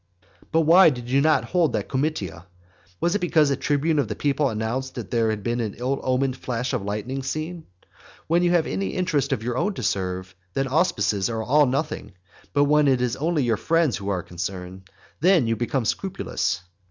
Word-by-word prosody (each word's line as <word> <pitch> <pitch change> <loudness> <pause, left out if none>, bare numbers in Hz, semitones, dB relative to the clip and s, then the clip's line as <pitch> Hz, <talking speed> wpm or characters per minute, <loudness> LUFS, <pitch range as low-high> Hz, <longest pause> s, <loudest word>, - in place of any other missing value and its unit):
But 165 - +3
why 165 +3 +7
did 120 -3 -6
you 135 +1 +4
not 155 -2 +3
hold 170 -7 +1
that - - -2
comitia? 130 - -3 0.5
Was 175 - +1
it 205 - +1
because 160 -5 +3
a - - +2
tribune 145 +3 +1
of 140 - +1
the - - -4
people 145 0 +1
announced 115 +4 -3
that - - -6
there 115 -2 +2
had 105 -2 -3
been 120 +2 -1
an 110 -3 -3
ill 130 +3 -2
omened 130 0 0
flash 125 0 -3
of - - 0
lightning 105 +7 -3
seen? 155 +5 -4 0.6
When 170 +2 +2
you 175 - +3
have 175 -2 +3
any 95 0 -3
interest 155 -6 0
of 115 -5 -1
your 120 +1 -2
own 205 -1 0
to 125 - -5
serve, 95 -2 -2 0.2
then 135 0 0
auspices 115 - +1
are 110 -1 -2
all 145 +5 +4
nothing; 135 -6 -3 0.4
but 145 0 +3
when 150 0 +4
it 130 -2 +3
is 125 -1 0
only 155 0 0
your 115 -3 +1
friends 165 - +1
who 100 0 -5
are 90 -3 -1
concerned, 95 +1 -6 0.3
then 175 -4 +4
you 115 0 +1
become 120 +2 -1
scrupulous. 180 - -2
130 Hz, 200 wpm, -24 LUFS, 110-155 Hz, 0.6 s, why